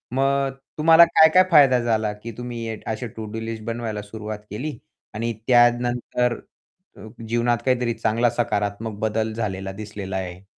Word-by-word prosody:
मग 135 Hz, 0 st, +1 dB, 0.3 s
तुम्हाला 165 Hz, +2 st, +7 dB
काय-काय 165 Hz, +2 st, +6 dB
फायदा 135 Hz, -5 st, +6 dB
झाला, 110 Hz, -3 st, 0 dB
की 110 Hz, +3 st, -9 dB
तुम्ही 115 Hz, -2 st, -5 dB
असे 110 Hz, +2 st, -3 dB
टू-डू-लिस्ट 110 Hz, 0 st, -6 dB
बनवायला 115 Hz, -3 st, -4 dB
सुरुवात 105 Hz, 0 st, -7 dB
केली 125 Hz, +7 st, -5 dB, 0.4 s
आणि 115 Hz, +2 st, -2 dB
त्यानंतर 120 Hz, 0 st, +2 dB, 0.6 s
अ, -, -, -12 dB, 0.3 s
जीवनात 120 Hz, +1 st, +1 dB
काहीतरी 125 Hz, -2 st, +1 dB
चांगला 115 Hz, +1 st, +1 dB
सकारात्मक 105 Hz, -2 st, -2 dB
बदल 110 Hz, 0 st, -1 dB
झालेला 95 Hz, -4 st, -4 dB
दिसलेला 100 Hz, -2 st, -6 dB
आहे. 90 Hz, 0 st, -6 dB
115 Hz, 130 wpm, -23 LUFS, 105-120 Hz, 0.6 s, तुम्हाला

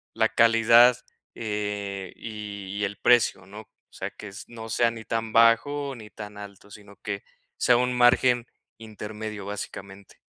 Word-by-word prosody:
la 110 Hz, 0 st, +3 dB
calidad, 115 Hz, +2 st, +6 dB, 0.4 s
eh, 105 Hz, -3 st, -4 dB
y 100 Hz, -3 st, -7 dB
y -, -, -1 dB
el 100 Hz, 0 st, -5 dB
precio, 110 Hz, -3 st, +3 dB
¿no?, 100 Hz, +3 st, -10 dB
o 110 Hz, -, -21 dB, 0.2 s
sea, -, -, -5 dB
que 105 Hz, -, -10 dB, 0.2 s
no 115 Hz, -1 st, -9 dB
sea 115 Hz, +1 st, +2 dB
ni 115 Hz, -1 st, -9 dB
tan 115 Hz, -1 st, -3 dB
bajo 125 Hz, +5 st, +3 dB
ni 110 Hz, -3 st, -11 dB
tan 105 Hz, -1 st, -10 dB
alto, 100 Hz, 0 st, -11 dB
sino 100 Hz, -1 st, -14 dB
que 100 Hz, -2 st, -5 dB, 0.3 s
sea 125 Hz, -, +4 dB
un 125 Hz, +1 st, +1 dB
margen 120 Hz, 0 st, +4 dB, 0.3 s
intermedio, 110 Hz, -1 st, -7 dB
básicamente. 100 Hz, -1 st, -8 dB
110 Hz, 150 wpm, -25 LUFS, 100-115 Hz, 0.4 s, calidad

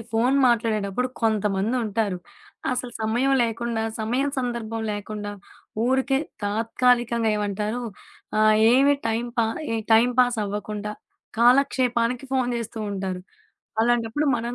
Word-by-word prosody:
Phone 245 Hz, +5 st, +2 dB
మాట్లాడేటప్పుడు 225 Hz, 0 st, 0 dB
కొంతమందుంటారు. 215 Hz, -1 st, 0 dB, 0.5 s
అసలు 250 Hz, -1 st, -3 dB
సమయం 240 Hz, +5 st, +1 dB
లేకుండా 230 Hz, 0 st, -2 dB, 0.2 s
సమయం 245 Hz, +6 st, 0 dB
సందర్భం 235 Hz, -3 st, -3 dB
లేకుండా 205 Hz, 0 st, -5 dB, 0.5 s
ఊరికే 265 Hz, +2 st, +2 dB, 0.3 s
తాత్కాలికంగా 230 Hz, +2 st, +1 dB
ఏమంటారు? 210 Hz, +3 st, -2 dB, 0.6 s
ఆహ్, 215 Hz, 0 st, +5 dB, 0.2 s
ఏమి 275 Hz, +3 st, +5 dB
టైం 225 Hz, +1 st, 0 dB
పా 230 Hz, -, +4 dB, 0.3 s
ఏ -, -, +1 dB, 0.2 s
టైమ్ 235 Hz, +3 st, +5 dB
పాాస్ 245 Hz, -2 st, +2 dB
అవ్వకుండా, 210 Hz, +1 st, -4 dB, 0.5 s
కాలక్షేపానికి 250 Hz, -1 st, +3 dB
ఫోను 255 Hz, -2 st, +1 dB
జేస్తూ 225 Hz, -1 st, -6 dB
ఉంటారు. 190 Hz, -2 st, -4 dB, 0.6 s
అలాంటప్పుడు 240 Hz, +5 st, +1 dB
మనం 235 Hz, +1 st, -4 dB
230 Hz, 105 wpm, -24 LUFS, 215-245 Hz, 0.6 s, ఆహ్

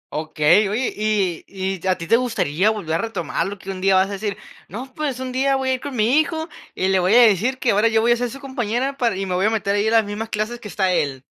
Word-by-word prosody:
Okey. 155 Hz, +6 st, +2 dB
Oye, 235 Hz, +5 st, -1 dB
y 205 Hz, -5 st, 0 dB
y, 190 Hz, -1 st, -4 dB
¿a 185 Hz, -, +2 dB
ti 170 Hz, -, -6 dB
te 230 Hz, +7 st, +4 dB
gustaría 215 Hz, -7 st, 0 dB
volver 200 Hz, -8 st, -3 dB
a -, -, +2 dB
retomarlo?, 195 Hz, -2 st, -3 dB
que 195 Hz, +1 st, -7 dB
un 185 Hz, -1 st, -7 dB
día 195 Hz, 0 st, +3 dB
vas 190 Hz, +1 st, +3 dB
a -, -, -7 dB
decir: 200 Hz, 0 st, -4 dB, 0.3 s
"No, 255 Hz, +7 st, -8 dB
pues, 285 Hz, -5 st, -3 dB
un 260 Hz, -1 st, -4 dB
día 270 Hz, +2 st, +1 dB
voy 265 Hz, -1 st, -1 dB
a -, -, +2 dB
ir 255 Hz, -, -3 dB
con 280 Hz, -1 st, -6 dB
mi 235 Hz, +6 st, +3 dB
hijo 320 Hz, +1 st, -2 dB, 0.3 s
y 185 Hz, -, 0 dB
le 190 Hz, -1 st, +3 dB
voy 185 Hz, +5 st, +3 dB
a 245 Hz, -, +8 dB
decir 230 Hz, +3 st, +3 dB
que 255 Hz, -, +1 dB
ahora 210 Hz, +3 st, +3 dB
yo 225 Hz, -1 st, +2 dB
voy 235 Hz, +1 st, +3 dB
a 240 Hz, -, +4 dB
ser 245 Hz, 0 st, -2 dB
su 275 Hz, -, -9 dB
compañera 260 Hz, 0 st, -2 dB
para 235 Hz, -6 st, +1 dB
y 195 Hz, -, -3 dB
me 185 Hz, -, -3 dB
voy 185 Hz, +3 st, +2 dB
a -, -, +3 dB
meter 210 Hz, -3 st, -1 dB
ahí 205 Hz, +1 st, +1 dB
a -, -, +1 dB
las 225 Hz, -1 st, +4 dB
mismas 210 Hz, +2 st, -5 dB
clases 220 Hz, +3 st, -3 dB
que -, -, -9 dB
está 190 Hz, -2 st, 0 dB
él". 135 Hz, -5 st, -1 dB
215 Hz, 285 wpm, -21 LUFS, 190-245 Hz, 0.3 s, a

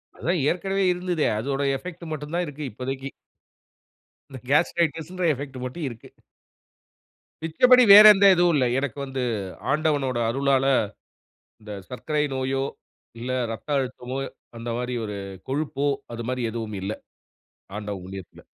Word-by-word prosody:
அதான் 175 Hz, +2 st, -1 dB
ஏற்கனவே 195 Hz, +2 st, -1 dB
இருந்துதே, 175 Hz, -3 st, -1 dB
அதனுடைய 135 Hz, +3 st, 0 dB
எஃபக்ட் 175 Hz, +1 st, -9 dB
மட்டும் 150 Hz, 0 st, -5 dB
தான் 175 Hz, 0 st, 0 dB
இருக்குது 145 Hz, -1 st, -6 dB
இப்போதைக்கு. 135 Hz, +4 st, -5 dB, 1.2 s
இந்த 135 Hz, -2 st, -9 dB
காஸ்டிரய்ட்டிஸ் 165 Hz, +1 st, +1 dB
என்ற 180 Hz, -1 st, -2 dB
எஃபக்ட் 135 Hz, -1 st, -7 dB
மட்டும் 150 Hz, +6 st, -5 dB
இருக்கு. 115 Hz, -2 st, -12 dB, 1.3 s
மிச்சபடி 250 Hz, +11 st, +5 dB
வேறு 210 Hz, +1 st, +11 dB
எந்த 200 Hz, 0 st, +3 dB
இதுவும் 175 Hz, -1 st, +3 dB
இல்லை 130 Hz, -3 st, +3 dB
எனக்கு 140 Hz, -3 st, -4 dB
வந்து, 135 Hz, -1 st, -3 dB, 0.5 s
ஆண்டவனுடைய 145 Hz, -5 st, +1 dB
அருளால, 135 Hz, +1 st, +2 dB, 1.0 s
இந்த 105 Hz, 0 st, -10 dB, 0.2 s
சர்க்கரை 150 Hz, +4 st, -1 dB
நோயோ, 135 Hz, +1 st, -1 dB, 0.6 s
இல்ல 120 Hz, +2 st, -5 dB, 0.2 s
இரத்த 115 Hz, +5 st, -7 dB
அழுத்தமோ, 130 Hz, 0 st, -4 dB, 0.4 s
அந்த 115 Hz, +1 st, -5 dB
மாதிரி 125 Hz, 0 st, -3 dB
ஒரு 105 Hz, -1 st, -5 dB, 0.3 s
கொழுப்போ, 145 Hz, 0 st, -1 dB, 0.3 s
அது 115 Hz, 0 st, -6 dB
மாரி 125 Hz, -2 st, -1 dB
எதுவும் 110 Hz, -2 st, -5 dB
இல்ல. 95 Hz, +2 st, -3 dB, 0.9 s
ஆண்டவன் 105 Hz, -3 st, -5 dB
புண்ணியத்தில. 95 Hz, -1 st, -10 dB
135 Hz, 130 wpm, -24 LUFS, 125-160 Hz, 1.3 s, வேறு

